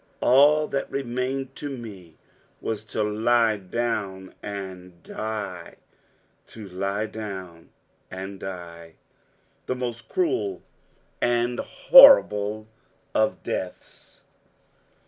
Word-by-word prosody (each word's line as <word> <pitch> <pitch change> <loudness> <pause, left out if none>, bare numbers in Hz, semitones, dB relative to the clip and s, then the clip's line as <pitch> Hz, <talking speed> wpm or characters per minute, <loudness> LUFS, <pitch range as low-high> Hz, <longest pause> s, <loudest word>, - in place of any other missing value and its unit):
All 150 +4 +5
that 135 - -2
remained 130 0 -3
to 140 -2 -5
me 95 -9 -11 0.4
was 110 -1 -4
to 110 0 -2
lie 110 +1 +2
down 95 -2 -3
and 95 -3 -8
die. 105 -5 -6 0.7
To 110 -3 -11
lie 100 +3 -2
down 95 -6 -8 0.4
and 95 +1 -7
die 85 -3 -9 0.7
the 130 - -1
most 125 -1 -5
cruel 375 +2 -1 0.6
and 120 0 +1
horrible 110 - +6 0.5
of 110 0 +1
deaths! - - -7
110 Hz, 90 wpm, -25 LUFS, 95-125 Hz, 0.7 s, horrible